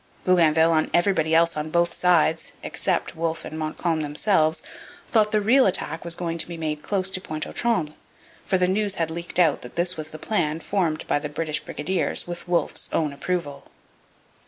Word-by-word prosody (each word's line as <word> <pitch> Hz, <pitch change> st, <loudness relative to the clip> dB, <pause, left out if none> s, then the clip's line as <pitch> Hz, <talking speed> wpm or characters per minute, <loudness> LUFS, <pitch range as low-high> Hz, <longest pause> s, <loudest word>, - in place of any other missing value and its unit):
Bougainville 165 Hz, -2 st, +4 dB
and 155 Hz, -1 st, +1 dB
everybody 175 Hz, -3 st, +2 dB
else 165 Hz, 0 st, +4 dB
on 150 Hz, +1 st, -3 dB
both 170 Hz, +1 st, +1 dB
sides 165 Hz, -3 st, +2 dB
except -, -, -1 dB
Wolfe 165 Hz, 0 st, -2 dB
and 155 Hz, -, -6 dB
Montcalm 155 Hz, +1 st, -1 dB
themselves 155 Hz, +1 st, +1 dB, 0.4 s
thought 215 Hz, -2 st, +3 dB
the 215 Hz, 0 st, +1 dB
real 250 Hz, +5 st, +5 dB
attack 165 Hz, -4 st, 0 dB
was 170 Hz, 0 st, 0 dB
going 170 Hz, -1 st, -3 dB
to -, -, +1 dB
be 170 Hz, -1 st, -7 dB
made 155 Hz, -2 st, -3 dB
close 190 Hz, 0 st, -1 dB
to 185 Hz, -, -2 dB
Pointe 155 Hz, -3 st, -4 dB
aux -, -, -8 dB
Trembles, 180 Hz, -11 st, -1 dB, 0.5 s
for 190 Hz, -, +2 dB
news 190 Hz, +2 st, +1 dB
had 165 Hz, -1 st, -1 dB
leaked 170 Hz, +1 st, -5 dB
out 165 Hz, -5 st, +3 dB
that 125 Hz, -, -11 dB
this 175 Hz, +1 st, 0 dB
was 155 Hz, 0 st, -4 dB
the 155 Hz, -, -8 dB
plan 160 Hz, -4 st, -1 dB
formed 165 Hz, -4 st, -1 dB
by -, -, +1 dB
the 150 Hz, 0 st, -5 dB
British 155 Hz, 0 st, -2 dB
brigadiers 170 Hz, +4 st, -1 dB
with 175 Hz, 0 st, -7 dB
Wolfe's 175 Hz, -1 st, 0 dB
own 150 Hz, -3 st, 0 dB
approval. 145 Hz, -2 st, -4 dB
165 Hz, 185 wpm, -24 LUFS, 155-180 Hz, 0.5 s, real